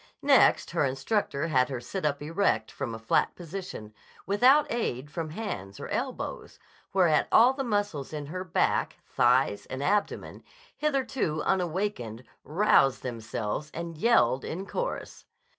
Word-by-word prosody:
Next - - +4
her - - +1
instructor 140 +3 -1
had 130 -3 +3
her 130 -3 -3
sit 150 +8 -3
up 145 0 -2
erect 155 - 0
from 115 -3 -4
a - - -6
flat 115 0 +1
position, 175 - -7 0.3
without 255 +9 +5
aid 145 - -2
from 165 -1 -4
hands 125 - -6
or - - -7
elbows, - - -4 0.3
whereat 175 -5 +3
all 245 +4 +6
the 270 0 -3
muscles 205 - -2
in 150 -2 -5
her 185 +5 -5
back, 185 - 0
thighs, 120 -4 +2
and 130 +1 -5
abdomen, 205 +5 -1 0.3
hitherto 270 - -1
unawakened, 175 - -1 0.2
roused 155 -6 +3
themselves 115 +2 -4
and 170 0 -5
yelled 145 - +3
in 185 +4 -5
chorus. - - -5
155 Hz, 140 wpm, -28 LUFS, 130-205 Hz, 0.3 s, all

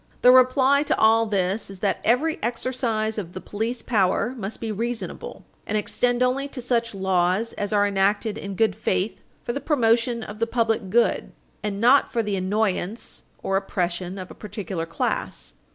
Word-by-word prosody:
The 250 - +9
reply 260 +2 +5
to 300 - 0
all 225 +1 +5
this 195 0 0
is 195 - -8
that 200 - 0
every 300 +8 +2
exercise 230 -2 -1
of 175 -3 -7
the 185 - -5
police 225 +5 -3
power 225 +2 +1
must 215 -3 -5
be 225 -1 -3
reasonable, 230 +3 -5 0.2
and 215 - 0
extend 245 +4 +1
only 265 +2 +1
to 280 - -8
such 235 -3 0
laws 190 +3 +1
as 205 0 -3
are 205 -1 +3
enacted 205 +2 +1
in 200 -3 -6
good 220 +3 +2
faith 190 +3 -1 0.2
for 240 - -3
the 280 - -3
promotion 235 -4 +2
for 210 - -6
the 225 +2 -1
public 225 -4 0
good, 235 +4 +2 0.3
and 200 -1 -3
not 250 +5 +5
for 235 -2 0
the 205 -2 -1
annoyance 195 +2 -1 0.2
or 195 - +1
oppression 180 -1 -2
of 185 -1 -7
a - - -8
particular 190 -5 -5
class. 165 - -3
220 Hz, 175 wpm, -24 LUFS, 195-240 Hz, 0.3 s, The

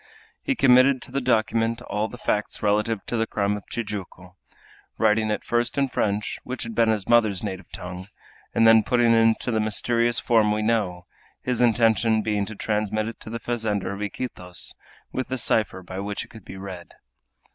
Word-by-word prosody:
He 275 - -1
committed 130 - +5
to - - -6
the 140 +1 -1
document 115 -1 +1
all 105 -1 -2
the 125 - -10
facts 105 -2 -2
relative 105 +1 +1
to - - -3
the 115 0 0
crime 100 0 0
of 105 - -9
Tijuco, 95 -5 -6 0.6
writing 110 0 +2
it 105 - -2
first 120 +2 0
in 140 -1 +2
French, 105 -3 -1
which 130 0 -4
had 115 -1 -5
been 115 0 +3
his 105 -3 0
mother's 110 -5 +3
native 95 -3 -6
tongue, 90 +1 -7 0.5
and 115 - +4
then 115 0 +7
putting 120 +2 +2
it - - +5
into 115 +2 +3
the 110 - +1
mysterious 115 +2 +1
form 110 -3 +3
we 105 0 0
know, 100 -6 0 0.4
his 125 -1 0
intention 115 -2 +3
being 105 -2 -1
to 110 - -7
transmit 110 0 -1
it 115 - -10
to 110 - -10
the 115 +1 -4
fazender 110 -5 -1
of 100 - -7
Iquitos, 100 -4 -5 0.4
with 130 - -3
the 130 - -3
cipher 110 -5 +1
by 95 +1 -7
which 100 +1 -4
it - - -23
could 110 -4 -14
be 95 - -9
read. 95 -3 -9
110 Hz, 190 wpm, -24 LUFS, 100-115 Hz, 0.6 s, then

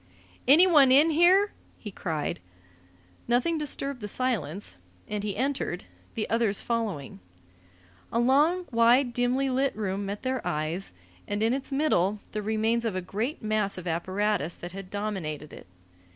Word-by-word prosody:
"Anyone 300 -2 +7
in 295 +5 +6
here?" 365 +6 +5 0.3
he 210 - -8
cried. 160 - -3 0.9
Nothing 250 +8 +1
disturbed 280 -3 -4
the 210 - -4
silence, 205 - -2 0.3
and 210 -1 -3
he 205 -2 -3
entered, 260 -8 -2 0.3
the 220 - -2
others 225 -3 +1
following. 210 - -3 0.9
A - - -1
long, 295 +9 +3
wide, 240 +2 +4
dimly 245 +3 +1
lit 270 +2 +1
room 200 -2 -2
met 200 +1 -5
their 260 -1 -1
eyes, 155 +5 -3 0.4
and 205 +1 -1
in 225 +2 +2
its 270 +1 -4
middle 215 - +1
the 215 - -3
remains 220 +2 0
of 225 -5 -2
a 185 - -1
great 220 - -4
mass 215 -2 0
of 185 - -7
apparatus 185 0 -1
that 175 - -8
had 195 0 -8
dominated 185 -8 -4
it. - - -12
220 Hz, 150 wpm, -27 LUFS, 195-265 Hz, 0.9 s, Anyone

